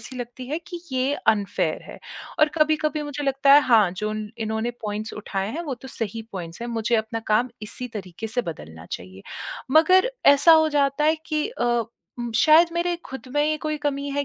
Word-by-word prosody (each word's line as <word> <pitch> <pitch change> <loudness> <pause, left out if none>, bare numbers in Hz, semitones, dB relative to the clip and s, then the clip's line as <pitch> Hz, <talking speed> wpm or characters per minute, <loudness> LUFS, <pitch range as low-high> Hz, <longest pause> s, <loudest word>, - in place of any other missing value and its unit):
ऐसी 255 +3 -8
लगती 245 +1 -7
है 305 +3 -2
कि 350 -2 -7
ये 260 +2 +1
अनफेयर 205 -2 +1
है। - - -11 0.4
और 305 - +6
कभी-कभी 305 0 +1
मुझे 290 0 -5
लगता 275 0 +4
है 290 - +9
हाँ, 220 -7 +4
जो 210 +3 -3
उन 215 -1 -5
इन्होंने 220 +1 -2
पॉइंट्स 215 +1 -4
उठाए 200 -1 -4
हैं 335 +3 -4
वो 285 -6 -4
तो 260 +2 -12
सही 225 -1 -4
पॉइंट्स 170 0 -7
हैं, 240 - -4
मुझे 230 0 -1
अपना 220 +1 -2
काम 240 +4 +3
इसी 250 +4 -5
तरीके 190 +2 -6
से 245 +2 -1
बदलना 80 - -12
चाहिए। 95 +2 -7 0.5
मगर 370 - +5 0.2
ऐसा 325 +4 +6
हो 315 - +2
जाता 280 +1 +1
है 315 +1 +4
कि 305 +2 0
अ, 465 - -3 0.5
उम, 240 -1 -3
शायद 315 +7 +6
मेरे 345 +1 0
खुद 265 0 -8
में 290 - +3
ही 310 0 +1
कोई 305 0 -1
कमी 285 -1 -2
है 285 0 -1
255 Hz, 200 wpm, -24 LUFS, 215-300 Hz, 0.5 s, है